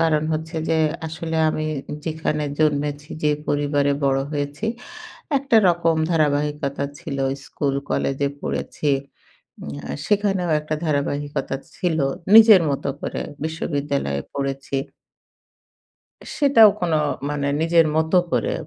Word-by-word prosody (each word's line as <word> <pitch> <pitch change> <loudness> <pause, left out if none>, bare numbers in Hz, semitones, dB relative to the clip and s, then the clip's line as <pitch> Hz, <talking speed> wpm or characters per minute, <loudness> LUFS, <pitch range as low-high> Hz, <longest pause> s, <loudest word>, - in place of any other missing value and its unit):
কারণ 160 -2 +2
হচ্ছে 160 +1 -4
যে 160 - +2 0.3
আসলে 160 +1 -4
আমি 155 0 -2 0.4
যেখানে 155 -2 -2
জন্মেছি 145 -1 0
যে 150 - +3 0.2
পরিবারে 145 -1 +1
বড় 135 0 +2
হয়েছি। 145 +6 -3 0.7
একটা 270 -4 +2
রকম 170 -1 +2
ধারাবাহিকতা 145 -2 0
ছিল 155 -6 -5 0.3
স্কুল 140 0 -2 0.2
কলেজে 140 +1 0
পড়েছি। 150 - -3 0.7
উম 70 - -6 0.2
আ - - -3
সেখানেও 195 -4 +1
একটা 155 0 -3
ধারাবাহিকতা 145 -2 -1 0.2
ছিল 170 -4 0 0.4
নিজের 220 -4 +9
মতো 140 - -2
করে - - -4 0.2
বিশ্ববিদ্যালয়ে 140 - -2
পড়েছি। 135 0 -3 1.6
সেটাও 275 -7 +7
কোনো 165 -3 +1 0.3
মানে 145 -1 -2
নিজের 165 0 +4
মত 160 +1 +1 0.2
করে - - +1
150 Hz, 110 wpm, -22 LUFS, 140-165 Hz, 1.6 s, নিজের